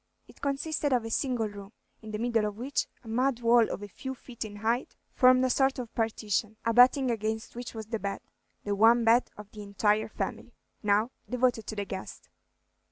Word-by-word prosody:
It -, -, -18 dB
consisted 285 Hz, +1 st, -1 dB
of 240 Hz, -3 st, +1 dB
a 225 Hz, -, -5 dB
single 245 Hz, -3 st, 0 dB
room, 205 Hz, 0 st, -10 dB, 0.3 s
in 220 Hz, -, -10 dB
the 215 Hz, -, -3 dB
middle 225 Hz, -1 st, +1 dB
of 210 Hz, 0 st, -6 dB
which 260 Hz, +4 st, -2 dB, 0.2 s
a -, -, -14 dB
mud 245 Hz, +2 st, 0 dB
wall 235 Hz, -1 st, +5 dB
of 205 Hz, -, -5 dB
a -, -, -6 dB
few 265 Hz, +6 st, -7 dB
feet 240 Hz, -2 st, -8 dB
in 210 Hz, -2 st, -8 dB
height 230 Hz, +4 st, -1 dB, 0.2 s
formed 255 Hz, -1 st, +5 dB
a -, -, +1 dB
sort 270 Hz, +1 st, +2 dB
of 245 Hz, -3 st, -6 dB
partition, 220 Hz, -1 st, -1 dB
abutting 250 Hz, +3 st, +5 dB
against 220 Hz, 0 st, -3 dB
which 240 Hz, -1 st, -7 dB
was 220 Hz, -1 st, -5 dB
the 225 Hz, +1 st, -3 dB
bed, 200 Hz, 0 st, -4 dB, 0.4 s
the 205 Hz, -, -1 dB
one 225 Hz, +4 st, +5 dB
bed 230 Hz, +2 st, +4 dB
of 210 Hz, -1 st, -11 dB
the 210 Hz, -, -9 dB
entire 205 Hz, +1 st, +1 dB
family, -, -, -5 dB, 0.3 s
now 210 Hz, +3 st, +2 dB, 0.2 s
devoted 250 Hz, -3 st, +1 dB
to 220 Hz, -, -4 dB
the 205 Hz, -1 st, -3 dB
guest. 190 Hz, -1 st, -8 dB
225 Hz, 200 wpm, -29 LUFS, 210-250 Hz, 0.4 s, wall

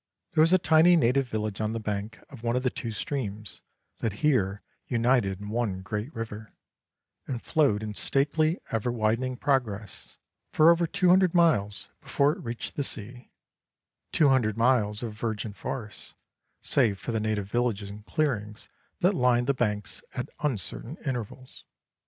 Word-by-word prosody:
There 155 Hz, -, +3 dB
was 165 Hz, +2 st, +5 dB
a 185 Hz, -, +7 dB
tiny 165 Hz, +1 st, +5 dB
native 135 Hz, -3 st, +2 dB
village 110 Hz, -2 st, -3 dB
on 110 Hz, 0 st, -1 dB
the 115 Hz, -, -2 dB
bank 105 Hz, 0 st, -4 dB
of 135 Hz, -5 st, -11 dB
one 120 Hz, 0 st, 0 dB
of 125 Hz, -, 0 dB
the 125 Hz, -, +1 dB
two 115 Hz, -, -4 dB
streams 110 Hz, -4 st, -5 dB, 0.4 s
that 110 Hz, -4 st, -1 dB
here 105 Hz, -9 st, +2 dB, 0.2 s
united 115 Hz, -5 st, +2 dB
in 105 Hz, 0 st, -7 dB
one 105 Hz, -4 st, -1 dB
great 105 Hz, +7 st, -4 dB
river, 110 Hz, -1 st, -7 dB, 0.7 s
and 125 Hz, -3 st, -3 dB
flowed 130 Hz, -8 st, +1 dB
in 105 Hz, -1 st, -4 dB
stately, 155 Hz, -, +1 dB
ever 115 Hz, +2 st, 0 dB
widening 120 Hz, +3 st, 0 dB
progress 110 Hz, -8 st, -2 dB, 0.4 s
for 160 Hz, +2 st, +7 dB
over 170 Hz, 0 st, +2 dB
two 185 Hz, 0 st, +2 dB
hundred 185 Hz, -1 st, +5 dB
miles 105 Hz, -, +2 dB
before 140 Hz, +1 st, +2 dB
it -, -, -6 dB
reached 115 Hz, 0 st, -5 dB
the 145 Hz, -, +1 dB
sea: 120 Hz, 0 st, -4 dB, 0.8 s
two 150 Hz, -3 st, +4 dB
hundred 115 Hz, -5 st, +2 dB
miles 115 Hz, -3 st, +2 dB
of 115 Hz, -3 st, -4 dB
virgin 110 Hz, -1 st, -3 dB
forest, 110 Hz, 0 st, -6 dB, 0.5 s
save 100 Hz, -3 st, +2 dB
for 120 Hz, -, -5 dB
the 110 Hz, -, 0 dB
native 105 Hz, -2 st, -1 dB
villages 110 Hz, -5 st, 0 dB
and 105 Hz, +1 st, -10 dB
clearings 110 Hz, -9 st, -2 dB, 0.3 s
that 185 Hz, +3 st, +4 dB
lined 125 Hz, -5 st, +3 dB
the 140 Hz, -, +2 dB
banks 105 Hz, -5 st, -2 dB
at -, -, -3 dB
uncertain 135 Hz, -, -3 dB
intervals. 130 Hz, 0 st, -4 dB
115 Hz, 160 wpm, -27 LUFS, 105-140 Hz, 0.8 s, a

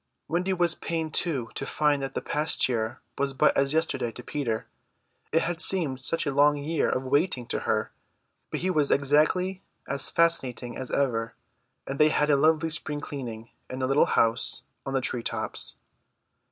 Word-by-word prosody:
Wendy 180 Hz, +4 st, 0 dB
was 175 Hz, -3 st, +3 dB
pained 160 Hz, -2 st, -3 dB
too 135 Hz, -10 st, 0 dB
to -, -, -4 dB
find 150 Hz, -2 st, +1 dB
that 135 Hz, 0 st, -5 dB
the -, -, -2 dB
past 150 Hz, +2 st, +1 dB
year 115 Hz, -3 st, -2 dB, 0.2 s
was 140 Hz, -1 st, 0 dB
but 145 Hz, +3 st, +3 dB
as 140 Hz, 0 st, +2 dB
yesterday 145 Hz, -7 st, 0 dB
to 125 Hz, -, -9 dB
Peter; 120 Hz, -7 st, -2 dB, 0.7 s
it 165 Hz, -, +3 dB
had 175 Hz, -1 st, -2 dB
seemed 150 Hz, -9 st, +2 dB
such 165 Hz, +6 st, 0 dB
a 145 Hz, -, -1 dB
long 145 Hz, +1 st, +4 dB
year 150 Hz, +3 st, 0 dB
of 130 Hz, -, -1 dB
waiting 140 Hz, -1 st, +1 dB
to -, -, -2 dB
her. -, -, 0 dB, 0.6 s
But -, -, -3 dB
he 185 Hz, +1 st, +1 dB
was 150 Hz, -5 st, +2 dB
exactly 155 Hz, +7 st, +2 dB, 0.3 s
as 140 Hz, 0 st, 0 dB
fascinating 130 Hz, -8 st, +1 dB
as 130 Hz, -, -6 dB
ever, 115 Hz, -4 st, 0 dB, 0.5 s
and 135 Hz, -, -5 dB
they 150 Hz, 0 st, +6 dB
had 150 Hz, 0 st, +2 dB
a -, -, +5 dB
lovely 160 Hz, +2 st, +3 dB
spring 150 Hz, -1 st, -1 dB
cleaning 120 Hz, -6 st, -7 dB, 0.2 s
in 130 Hz, -, -5 dB
the 130 Hz, -, -1 dB
little 135 Hz, +3 st, +3 dB
house 115 Hz, 0 st, +2 dB, 0.2 s
on 135 Hz, -, -2 dB
the 135 Hz, -, +2 dB
tree 125 Hz, -1 st, -2 dB
tops. -, -, -1 dB
140 Hz, 180 wpm, -27 LUFS, 130-160 Hz, 0.7 s, they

